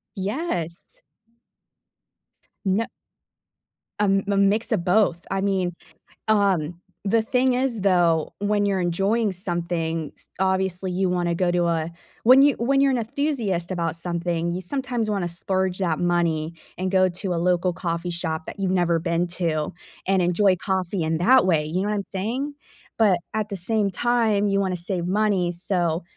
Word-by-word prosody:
Yes. 190 Hz, -, -4 dB, 1.7 s
Yeah 200 Hz, +4 st, +1 dB, 1.1 s
Um, 195 Hz, -1 st, +2 dB
m 200 Hz, -1 st, +3 dB
mix 225 Hz, +3 st, -1 dB
of 190 Hz, -6 st, +1 dB
both. 180 Hz, -3 st, +2 dB
I 195 Hz, 0 st, 0 dB
mean, 190 Hz, -3 st, 0 dB, 0.5 s
um, 185 Hz, -6 st, +2 dB, 0.3 s
the 225 Hz, +3 st, +3 dB
thing 250 Hz, +3 st, +2 dB
is, 250 Hz, -4 st, 0 dB
though, 175 Hz, -5 st, +2 dB
when 205 Hz, 0 st, +1 dB
you're 195 Hz, -2 st, +1 dB
enjoying 195 Hz, +5 st, +1 dB
something, 170 Hz, -4 st, -3 dB
s -, -, -11 dB
obviously, 190 Hz, -1 st, 0 dB
you 185 Hz, 0 st, 0 dB
wanna 175 Hz, -1 st, 0 dB
go 175 Hz, 0 st, +1 dB
do, 175 Hz, -1 st, +1 dB
uh 165 Hz, -1 st, 0 dB, 0.4 s
when 255 Hz, +4 st, +8 dB
you 285 Hz, -1 st, +5 dB
when 275 Hz, +3 st, +2 dB
you're 275 Hz, -1 st, +4 dB
an 255 Hz, -, +1 dB
enthusiast 220 Hz, -, -1 dB
about 170 Hz, -3 st, -1 dB
something, 170 Hz, 0 st, -2 dB
you 185 Hz, -, -3 dB
sometimes 245 Hz, +1 st, -2 dB
wanna 195 Hz, -4 st, -1 dB
splurge 185 Hz, +2 st, -1 dB
that 170 Hz, -4 st, 0 dB
money 170 Hz, -2 st, 0 dB, 0.2 s
and 185 Hz, +1 st, -2 dB
go 185 Hz, -1 st, +4 dB
to 180 Hz, +1 st, -3 dB
a -, -, -1 dB
local 180 Hz, +1 st, +2 dB
coffee 170 Hz, -1 st, -3 dB
shop 160 Hz, -2 st, -3 dB
that -, -, -9 dB
you've 190 Hz, -1 st, 0 dB
never 175 Hz, -2 st, +2 dB
been 170 Hz, +1 st, 0 dB
to 165 Hz, -4 st, -2 dB, 0.3 s
and 190 Hz, -1 st, +3 dB
enjoy 185 Hz, +2 st, +3 dB
coffee 190 Hz, -2 st, -1 dB
in 160 Hz, 0 st, 0 dB
that 255 Hz, +5 st, +5 dB
way. 160 Hz, -4 st, +2 dB
You 175 Hz, +5 st, -1 dB
know 205 Hz, -, -1 dB
what 210 Hz, -, 0 dB
I'm 200 Hz, -, -2 dB
saying? 240 Hz, +10 st, -2 dB, 0.4 s
But 200 Hz, -6 st, +4 dB
at 215 Hz, 0 st, -2 dB
the 200 Hz, -, -4 dB
same 205 Hz, +2 st, 0 dB
time, 220 Hz, -2 st, +1 dB
you 195 Hz, 0 st, +1 dB
wanna 190 Hz, -2 st, 0 dB
save 175 Hz, 0 st, -3 dB
money, 195 Hz, -3 st, +1 dB
so, 175 Hz, -1 st, -1 dB
185 Hz, 165 wpm, -24 LUFS, 175-205 Hz, 1.7 s, when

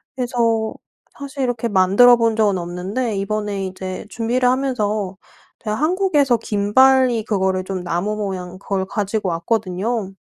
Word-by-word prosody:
그래서 230 Hz, -3 st, 0 dB, 0.4 s
사실 280 Hz, -1 st, -5 dB
이렇게 240 Hz, -2 st, -1 dB
만들어 205 Hz, +6 st, +6 dB
본 230 Hz, -1 st, +1 dB
적은 205 Hz, -4 st, +2 dB
없는데 190 Hz, +7 st, -3 dB
이번에 200 Hz, -1 st, -2 dB
이제 185 Hz, +1 st, -6 dB
준비를 245 Hz, +2 st, 0 dB
하면서 215 Hz, -7 st, -1 dB, 0.4 s
제가 215 Hz, -1 st, -3 dB
한국에서 305 Hz, -6 st, +2 dB
김발이 235 Hz, +3 st, +3 dB
그거를 190 Hz, -2 st, 0 dB
좀 185 Hz, -1 st, -5 dB
나무 175 Hz, +5 st, -2 dB
모양 185 Hz, -3 st, -5 dB
그걸 195 Hz, -1 st, -2 dB
가지고 205 Hz, -1 st, -2 dB
왔거든요. 195 Hz, +3 st, -2 dB
215 Hz, 315 characters per minute, -20 LUFS, 190-245 Hz, 0.4 s, 만들어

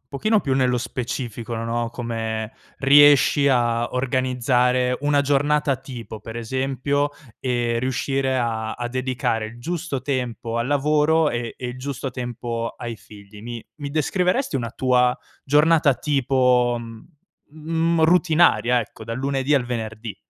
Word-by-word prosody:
un 125 Hz, -, -50 dB
pochino 215 Hz, -, +1 dB
più 135 Hz, -7 st, -1 dB
nello 125 Hz, -2 st, +2 dB
specifico, 120 Hz, -2 st, -4 dB
no, 115 Hz, +1 st, -2 dB
come 115 Hz, -2 st, -4 dB, 0.3 s
riesci 145 Hz, 0 st, +6 dB
a 120 Hz, -3 st, +1 dB
organizzare 125 Hz, -1 st, +1 dB
una 145 Hz, -1 st, +3 dB
giornata 145 Hz, 0 st, +1 dB
tipo, 125 Hz, -4 st, -9 dB
per 110 Hz, +2 st, -9 dB
esempio, 135 Hz, +4 st, -1 dB, 0.3 s
e 120 Hz, -2 st, -1 dB
riuscire 130 Hz, +1 st, -1 dB
a 110 Hz, -3 st, -1 dB
a 120 Hz, 0 st, -4 dB
dedicare 125 Hz, -3 st, -1 dB
il 115 Hz, +2 st, -11 dB
giusto 165 Hz, -1 st, -3 dB
tempo 125 Hz, -4 st, -3 dB
al 115 Hz, -, 0 dB
lavoro 150 Hz, +2 st, +2 dB
e 120 Hz, -1 st, -4 dB
e 125 Hz, -, -6 dB
il 125 Hz, +1 st, -7 dB
giusto 135 Hz, 0 st, -4 dB
tempo 120 Hz, -2 st, -4 dB
ai 120 Hz, -2 st, -6 dB
figli. 105 Hz, -1 st, -14 dB
Mi 120 Hz, -1 st, -7 dB
mi 145 Hz, -2 st, -6 dB
descriveresti 180 Hz, -, 0 dB
una 120 Hz, -2 st, -3 dB
tua 125 Hz, -1 st, +2 dB, 0.3 s
giornata 150 Hz, 0 st, +4 dB
tipo, 125 Hz, -3 st, +2 dB, 0.7 s
mhmm, 160 Hz, +2 st, -1 dB
routinaria, 160 Hz, -9 st, +4 dB
ecco, 110 Hz, 0 st, -9 dB
dal 115 Hz, +2 st, -5 dB
lunedì 135 Hz, +1 st, 0 dB
al 135 Hz, -3 st, +2 dB
venerdì? 110 Hz, -3 st, -5 dB
125 Hz, 135 wpm, -22 LUFS, 120-145 Hz, 0.7 s, riesci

